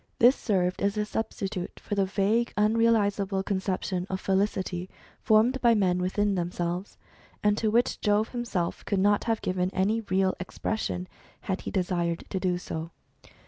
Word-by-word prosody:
This 245 +4 +6
served 185 -5 0
as 200 +1 +1
a 210 - +1
substitute 200 -4 -4
for - - -6
the 200 -1 +2
vague 210 +5 +1
unrealisable 210 -3 +2
conception 190 -1 -2
of 190 - -2
felicity 190 -2 -1 0.3
formed 230 +5 +3
by 235 -2 +5
men 185 -4 +2
within 200 +3 +1
themselves, 175 +1 -3 0.5
and 210 0 +4
to 220 - +1
which 235 +3 +1
Jove 210 +1 +2
himself 230 -8 -3
could 200 - 0
not 205 +2 +3
have 225 -2 0
given 185 0 0
any 205 +4 +1
real 190 0 +2
expression, 185 0 -3 0.3
had 190 0 -3
he - - -5
desired 175 -3 -1
to 190 - -1
do 180 -1 0
so. 165 -2 -5
195 Hz, 155 wpm, -27 LUFS, 185-215 Hz, 0.5 s, This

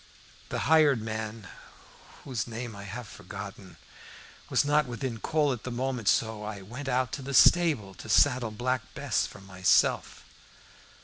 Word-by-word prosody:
The - - -2
hired 155 -5 +5
man, 110 -1 -5 0.8
whose 125 -5 -3
name 115 -1 -6
I 100 0 -9
have 115 +4 -7
forgotten, 100 0 -9 0.7
was - - +2
not 150 -1 +3
within 120 -1 -4
call 150 +2 +1
at 120 - -7
the - - -4
moment, 125 -2 -3
so 110 0 +1
I 105 -2 -6
went 125 +8 -8
out 130 0 +1
to - - -5
the 135 +1 -4
stable 150 - +5
to 110 - -11
saddle 130 +1 +4
Black 125 +4 -1
Bess - - 0
for - - -13
myself. 95 -1 +1
120 Hz, 150 wpm, -28 LUFS, 105-130 Hz, 0.8 s, hired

